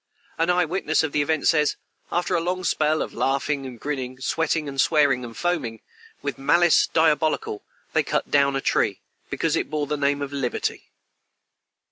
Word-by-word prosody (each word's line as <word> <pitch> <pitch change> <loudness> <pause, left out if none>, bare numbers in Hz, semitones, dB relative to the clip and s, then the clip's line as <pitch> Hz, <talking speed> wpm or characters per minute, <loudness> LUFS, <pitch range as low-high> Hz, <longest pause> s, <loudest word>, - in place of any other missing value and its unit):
An 165 +1 +2
eye 180 -1 +3
witness 160 -2 0
of 160 - -2
the 150 - +1
event 155 +1 0
says: 150 -3 +3 0.4
"After 175 +1 0
a 170 - +2
long 180 +2 -2
spell 155 -2 +1
of - - -8
laughing 135 +1 -1
and 125 -3 -10
grinning, 130 -2 -4
sweating, 150 +1 -1
swearing, 140 -4 +3
and 115 -1 -9
foaming, 145 -11 -1 0.4
with 140 -3 -3
malice 170 +5 +4
diabolical, 155 -8 +1 0.3
they - - +4
cut - - -2
down 140 -1 +3
a 135 - -1
tree, - - +1 0.3
because - - 0
it - - -1
bore 150 -1 -1
the 150 +1 -2
name 145 0 +1
of 140 0 -6
liberty." 135 -3 -3
150 Hz, 170 wpm, -24 LUFS, 135-160 Hz, 0.4 s, malice